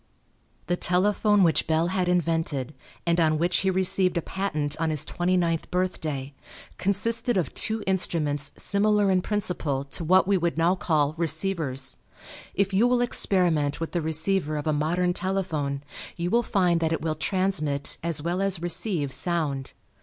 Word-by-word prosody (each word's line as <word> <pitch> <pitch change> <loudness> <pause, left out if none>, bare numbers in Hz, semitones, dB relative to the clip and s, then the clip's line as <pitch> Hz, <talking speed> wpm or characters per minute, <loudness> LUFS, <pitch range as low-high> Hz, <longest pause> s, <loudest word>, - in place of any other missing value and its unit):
The 175 - 0
telephone 205 +3 +2
which 165 -2 +2
Bell 160 +2 +2
had 185 -1 0
invented, 165 -6 0 0.3
and 170 0 +2
on 155 -2 +3
which 175 +2 +1
he 190 - +1
received 185 -1 +1
a - - +1
patent 155 -7 -2
on 165 -1 0
his 155 -1 -1
twenty 180 +1 0
ninth 165 -2 0
birthday, 155 -7 -2 0.5
consisted 230 +4 0
of 180 - -1
two 220 -1 -1
instruments 155 -7 0
similar 205 0 +2
in 185 -1 +3
principle 180 -9 -1
to 140 +4 -7
what 185 +3 +4
we 195 -2 +3
would 170 -1 -1
now 170 +2 +3
call 155 -5 +1
receivers. 160 -6 -1 0.6
If 200 0 +1
you 215 +6 +4
will 245 0 +2
experiment 175 -11 +1
with 165 - -4
the 175 - -1
receiver 160 +1 +1
of 145 - -4
a 155 - +1
modern 175 +4 +1
telephone 160 -7 -2 0.3
you 175 +1 -2
will 235 - +4
find 180 -6 +1
that 160 -1 0
it 160 - -2
will 160 -1 0
transmit 155 -6 -1
as 165 -3 -2
well 175 +3 -1
as 195 -3 0
receive 170 - -1
sound. 150 -6 -1
175 Hz, 165 wpm, -26 LUFS, 155-190 Hz, 0.6 s, what